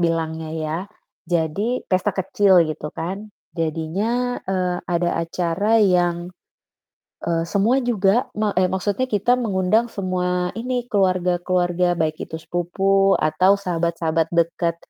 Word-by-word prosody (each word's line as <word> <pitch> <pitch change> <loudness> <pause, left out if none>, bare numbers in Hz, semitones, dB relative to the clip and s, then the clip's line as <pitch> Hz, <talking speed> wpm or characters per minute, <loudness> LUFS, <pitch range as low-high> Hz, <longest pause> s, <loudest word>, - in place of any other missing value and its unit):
bilangnya 160 -1 -1
ya. 155 +1 -2 0.5
Jadi 175 +9 -1
pesta 185 -1 +1
kecil 190 -2 +4
gitu 155 -1 -5
kan, 195 +6 -5 0.3
jadinya, 190 +10 -1
eee, 180 -2 0
ada 175 0 +1
acara 180 +6 0
yang, 175 -3 +2 0.9
eee, 165 -1 +1
semua 225 +9 +2
juga 225 -1 +2
ma 215 -1 +1
eh 185 - +3
maksudnya 205 +7 -1
kita 210 +4 +2
mengundang 215 +2 +1
semua 180 -2 -1
ini 245 +1 -2
keluarga-keluarga 180 -2 +1
baik 155 -1 0
itu 160 - -5
sepupu 195 +4 +1
atau 185 +6 +3
sahabat-sahabat 165 -3 -1
deket, 170 0 0
180 Hz, 115 wpm, -21 LUFS, 170-200 Hz, 0.9 s, kecil